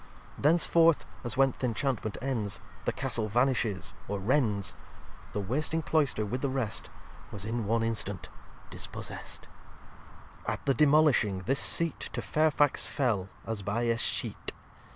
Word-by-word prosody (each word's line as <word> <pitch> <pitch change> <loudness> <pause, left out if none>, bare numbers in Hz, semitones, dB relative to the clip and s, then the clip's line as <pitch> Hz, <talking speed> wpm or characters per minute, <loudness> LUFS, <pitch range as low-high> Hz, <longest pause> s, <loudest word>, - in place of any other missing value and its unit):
Thenceforth 165 +1 +4 0.2
(as 120 0 -3
when 135 0 +5
th' - - -16
Inchantment 120 -2 -1
ends 115 -8 -2 0.3
The - - +1
Castle 115 -5 -2
vanishes 120 -4 0
or 100 - -2
rends) 105 -2 +1 0.6
The - - -1
wasting 150 +10 -1
Cloister 140 -7 +1
with 125 +5 -3
the 140 - 0
rest 130 -5 -3 0.4
Was 100 -1 -4
in 115 -1 -2
one 115 +1 +1
instant 110 -3 -2 0.4
dispossest. - - -6
xxxv - - -18 1.0
At - - -3
the 135 - +3
demolishing, 140 -9 +3
this 135 +3 +2
Seat 170 -2 +3
To - - -2
Fairfax 150 -2 +2
fell 110 -10 0 0.2
as 115 -2 -3
by 105 +5 -1
Escheat. 115 0 +2
120 Hz, 135 wpm, -29 LUFS, 105-140 Hz, 1.0 s, when